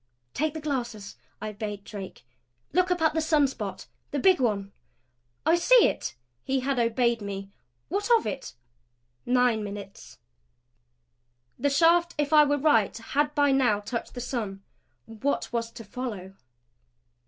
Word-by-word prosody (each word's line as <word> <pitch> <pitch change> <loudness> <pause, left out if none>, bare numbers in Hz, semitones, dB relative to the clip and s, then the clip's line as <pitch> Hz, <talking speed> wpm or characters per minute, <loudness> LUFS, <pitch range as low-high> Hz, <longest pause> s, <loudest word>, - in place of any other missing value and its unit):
"Take 310 +2 -1
the - - -3
glasses," 240 - -4 0.2
I 215 +1 -4
bade 210 -1 -6
Drake. 200 - -9 0.5
"Look 365 +1 +3
up 355 -2 0
at 315 - +3
the 320 - +1
sun 310 -3 +3
spot 210 -7 -6 0.2
the 290 - -3
big 370 +5 +4
one." 200 -5 0 0.7
"I 325 - +4
see 445 +8 +6
it." - - -2 0.3
He 265 0 0
had 270 0 0
obeyed 235 0 +1
me. 195 -1 -6 0.4
"What 405 +5 -2
of 445 - -5
it?" 270 - -5 0.7
Nine 245 -3 +3
minutes. 200 -1 -9 1.4
The 285 - +2
shaft, 335 +4 +4
if 295 +1 0
I 300 -1 +8
were 290 0 +1
right, 265 -10 +3
had 290 +6 -1
by 285 -1 +4
now 250 -6 +3
touched 230 +5 -5
the 245 - -4
sun. 215 -6 -4 0.4
What 240 +4 -3
was 230 -1 -1
to 230 - -9
follow? 205 -4 -6
250 Hz, 150 wpm, -27 LUFS, 210-295 Hz, 1.4 s, I